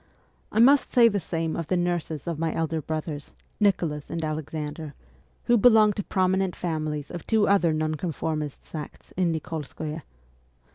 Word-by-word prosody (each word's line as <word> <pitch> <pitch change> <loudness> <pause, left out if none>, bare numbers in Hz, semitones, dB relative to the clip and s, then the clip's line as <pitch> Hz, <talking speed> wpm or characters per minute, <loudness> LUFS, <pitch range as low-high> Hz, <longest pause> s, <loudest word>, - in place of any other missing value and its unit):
I - - -4
must 275 +4 +6
say 235 -2 +6
the 205 -2 0
same 165 -2 -2
of 165 - -3
the 185 - +1
nurses 175 -4 -2
of 170 -3 -3
my 165 -1 -1
elder 160 -1 -1
brothers, 155 -1 -5 0.2
Nicholas 170 -8 +1
and 165 -1 -2
Alexander, 155 -1 -5 0.5
who 240 -1 +4
belonged 215 -2 +6
to 205 - -1
prominent 190 0 +1
families 155 -3 -3
of 175 -2 -7
two 220 -2 +3
other 190 -4 +4
Nonconformist 155 -1 -2
sects 150 -3 -9
in 180 -2 +2
Nikolskoye. 155 0 -5
165 Hz, 150 wpm, -26 LUFS, 155-185 Hz, 0.5 s, must